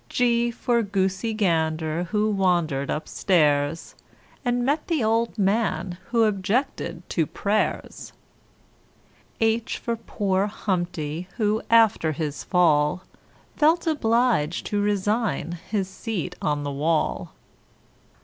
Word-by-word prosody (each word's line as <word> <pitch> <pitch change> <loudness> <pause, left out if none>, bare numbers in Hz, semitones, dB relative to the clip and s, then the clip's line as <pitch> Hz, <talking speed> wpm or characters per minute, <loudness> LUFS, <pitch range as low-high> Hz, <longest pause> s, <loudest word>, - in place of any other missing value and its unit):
G 240 -1 +2
for 235 0 0
Goosey 195 +1 -1
Gander 160 -4 0
who 215 +3 0
wandered 175 -8 +1
upstairs, 150 -2 +1 0.5
And 245 -1 0
met 295 +3 0
the 320 -8 0
old 225 +1 +1
man 190 -4 0
who 235 -1 +3
objected 205 -2 -1
to 160 -4 0
prayers. 210 +1 -2 1.3
[Illustration: 225 0 +3
HIJ] - - -19
H - - -3
for 235 - -2
poor 200 -3 -1
Humpty 175 -5 -3
who 215 -1 +1
after 220 -8 +4
his 150 -1 -4
fall, 165 -1 +2 0.5
Felt 320 +4 +3
obliged 235 - +1
to 205 -1 -1
resign 205 -3 -1
his 200 -3 0
seat 190 -3 -4
on 145 -1 0
the 145 - -3
wall. 155 +3 -1
195 Hz, 115 wpm, -24 LUFS, 165-225 Hz, 1.3 s, after